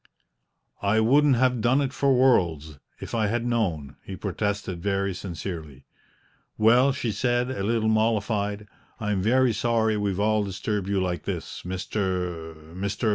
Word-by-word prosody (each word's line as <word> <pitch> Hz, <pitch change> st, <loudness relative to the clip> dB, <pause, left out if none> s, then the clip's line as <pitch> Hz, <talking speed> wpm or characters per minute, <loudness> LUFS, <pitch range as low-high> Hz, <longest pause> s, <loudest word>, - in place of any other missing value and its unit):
"I 100 Hz, +2 st, +2 dB
wouldn't 135 Hz, +5 st, +4 dB
have 125 Hz, -1 st, +2 dB
done 125 Hz, +5 st, +3 dB
it 135 Hz, -2 st, -1 dB
for 140 Hz, -1 st, +2 dB
worlds, 85 Hz, -, +2 dB, 0.2 s
if -, -, -8 dB
I 110 Hz, -2 st, +1 dB
had 120 Hz, +2 st, -1 dB
known!" 85 Hz, -, -1 dB
he 95 Hz, -, -7 dB
protested 100 Hz, -2 st, -3 dB
very 100 Hz, 0 st, 0 dB
sincerely. 85 Hz, -6 st, -7 dB, 0.7 s
"Well," 120 Hz, +5 st, +5 dB
she 125 Hz, -4 st, -2 dB
said, 120 Hz, +4 st, 0 dB
a 130 Hz, -, -4 dB
little 110 Hz, +2 st, 0 dB
mollified, 105 Hz, -1 st, 0 dB, 0.3 s
"I 105 Hz, -1 st, -2 dB
am 95 Hz, -2 st, 0 dB
very 125 Hz, +3 st, +3 dB
sorry 110 Hz, -1 st, +1 dB
we've 100 Hz, -2 st, -1 dB
all 105 Hz, 0 st, +2 dB
disturbed 100 Hz, 0 st, -3 dB
you 100 Hz, -1 st, +1 dB
like 90 Hz, -4 st, -2 dB
this, -, -, -5 dB
Mr. 90 Hz, -3 st, -3 dB, 0.2 s
Mr. 100 Hz, +5 st, -2 dB
105 Hz, 150 wpm, -25 LUFS, 95-115 Hz, 0.7 s, Well